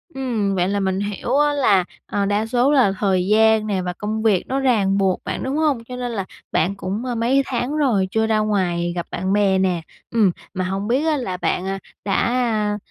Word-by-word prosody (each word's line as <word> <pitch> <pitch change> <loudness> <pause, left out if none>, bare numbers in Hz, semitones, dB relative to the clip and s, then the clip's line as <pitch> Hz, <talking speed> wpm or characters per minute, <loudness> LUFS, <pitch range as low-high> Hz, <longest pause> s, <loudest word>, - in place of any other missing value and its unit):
Ừm, 225 -7 -1
vậy 180 0 +1
là 200 0 0
mình 190 -1 0
hiểu 205 +6 -2
á, 295 0 +3
là, 210 -10 +3 0.2
à, 200 -1 -1
đa 205 +2 0
số 245 +4 +2
là 260 -9 +4
thời 190 -3 +1
gian 220 +1 +4
nè 195 -3 0
và 180 0 -3
công 215 +3 -3
việc 210 -5 +2
nó 265 +1 -1
ràng 215 -7 +2
buộc 190 -2 +1
bạn, - - -4
đúng 265 +3 -2
hông? 295 -7 +1
Cho 250 +2 -8
nên 245 -1 -4
là 200 -5 -3 0.3
bạn 180 +5 +1
cũng, 200 +5 -4
ờ, 245 - -2
mấy 250 +4 +2
tháng 255 +2 -2
rồi 230 -11 +2
chưa 220 +1 +1
ra 220 -1 +2
ngoài 180 -5 0
gặp 175 - -3
bạn 185 +2 -1
bè 200 -2 +3
nè. 185 -3 +1 0.3
Ừm, 215 -6 +3 0.2
mà 185 -1 -2
hông 195 +2 -3
biết 265 +6 +1
á, 310 -2 +2
là 190 -9 -3
bạn, 180 +1 -1
à, 195 0 -3 0.3
đã, 195 - 0
à, 225 -4 0
210 Hz, 230 wpm, -21 LUFS, 190-245 Hz, 0.3 s, là